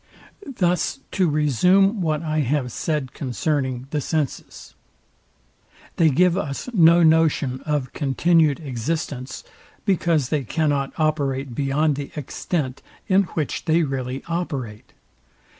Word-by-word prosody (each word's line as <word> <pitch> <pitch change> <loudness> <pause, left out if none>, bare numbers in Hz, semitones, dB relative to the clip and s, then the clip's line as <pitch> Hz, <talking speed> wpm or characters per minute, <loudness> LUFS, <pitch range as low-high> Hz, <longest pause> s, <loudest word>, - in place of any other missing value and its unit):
Thus 180 +8 0
to 185 -4 +2
resume 180 - +3
what 155 -2 0
I 155 -1 -1
have 135 -2 0
said 150 -1 -2
concerning 130 -1 -2
the 150 - -1
senses; 150 -2 -4 1.2
they 165 -2 +5
give 180 +5 +3
us 150 - -3
no 170 -3 +6
notion 155 -5 +3
of 145 -4 -1
continued 155 +1 +2
existence, 135 0 -4 0.4
because 165 - +1
they 150 -3 0
cannot 145 0 0
operate 140 -4 -1
beyond 140 +3 +1
the 140 -1 -5
extent, 145 -1 -3 0.3
in 195 -1 +4
which 155 -4 -2
they 165 +1 +3
really 135 -2 -3
operate. 140 -11 -4
150 Hz, 115 wpm, -22 LUFS, 135-165 Hz, 1.2 s, no